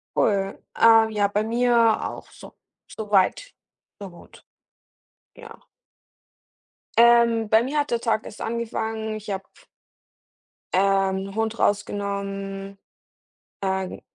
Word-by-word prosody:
Cool. 195 -2 0 0.2
Ähm, 225 -1 +6
ja, 205 -2 +1
bei 205 +1 -1
mir 240 +2 +1 0.3
auch - - -10
so - - -14 0.3
soweit 215 - 0 0.5
so 200 -2 -8
gut. 175 - -17 0.9
Ja. - - -13 1.4
Ähm, 235 -2 +5
bei 220 +2 +4
mir 290 +4 -1
hat 290 - -2
der 235 -1 0
Tag 220 -2 0
erst 210 - -10
angefangen, 220 -1 -3
ich 215 0 -9
habe 195 -1 -3 1.3
ähm, 195 0 +1
Hund 225 +1 -2
rausgenommen. 200 -1 -3 0.8
Ähm, 190 -1 -3
210 Hz, 105 wpm, -23 LUFS, 195-230 Hz, 1.4 s, Ähm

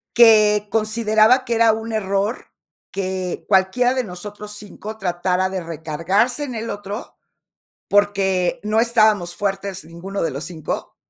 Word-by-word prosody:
Que 215 -3 +6
consideraba 220 +2 +3
que 240 -2 -2
era 225 -1 +5
un 225 +1 -5
error, 205 +1 -1 0.4
que 185 -2 -3
cualquiera 190 +7 +3
de 255 -2 -1
nosotros 205 +3 -8
5 210 +1 -8
tratara 180 0 0
de 190 -1 -3
recargarse 170 - -1
en 255 -4 -6
el 225 +1 -4
otro, 205 +2 -7 0.7
porque 195 -3 +1
no 215 +1 +1
estábamos 215 -7 +2
fuertes 195 -2 -3
ninguno 175 +5 -6
de 165 - 0
los 140 +4 -5
5". 160 -4 -5
205 Hz, 135 wpm, -21 LUFS, 185-220 Hz, 0.7 s, Que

